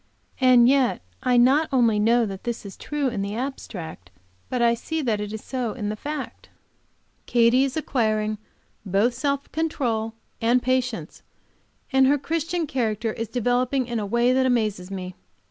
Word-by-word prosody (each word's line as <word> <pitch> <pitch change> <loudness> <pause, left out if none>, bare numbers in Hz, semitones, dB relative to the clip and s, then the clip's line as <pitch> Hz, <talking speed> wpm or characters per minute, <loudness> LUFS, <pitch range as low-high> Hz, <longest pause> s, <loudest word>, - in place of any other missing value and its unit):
And 250 -2 +6
yet 260 - +2 0.2
I 250 -1 +2
not 270 +6 +4
only 235 -5 +3
know 230 +2 +3
that 195 +1 -7
is 220 -4 -4
true 295 -2 -2
in 225 -5 -3
the 200 +1 -3
abstract, 185 - -6 0.4
but 250 - -1
I 235 0 +4
see 315 +7 -3
that 220 -5 0
it 210 0 -4
is 220 0 -6
so 250 -4 -3
in 210 -5 -4
the 215 - -2
fact. 290 +5 -6 0.8
Katy 240 +2 +4
is 275 +2 -4
acquiring 215 -7 0 0.4
both 205 +5 +2
self 280 +3 -2
control 235 -9 -1 0.3
and 235 +2 +4
patience 245 -9 -2 0.7
and 265 0 +5
her 285 +2 +4
Christian 330 +3 -2
character 225 -5 -1
is 230 - -4
developing 250 +2 0
in 235 -1 -3
a 210 - -2
way 235 +4 +2
that 260 0 +3
amazes 215 -7 0
me. 185 -1 -6
240 Hz, 165 wpm, -24 LUFS, 215-265 Hz, 0.8 s, And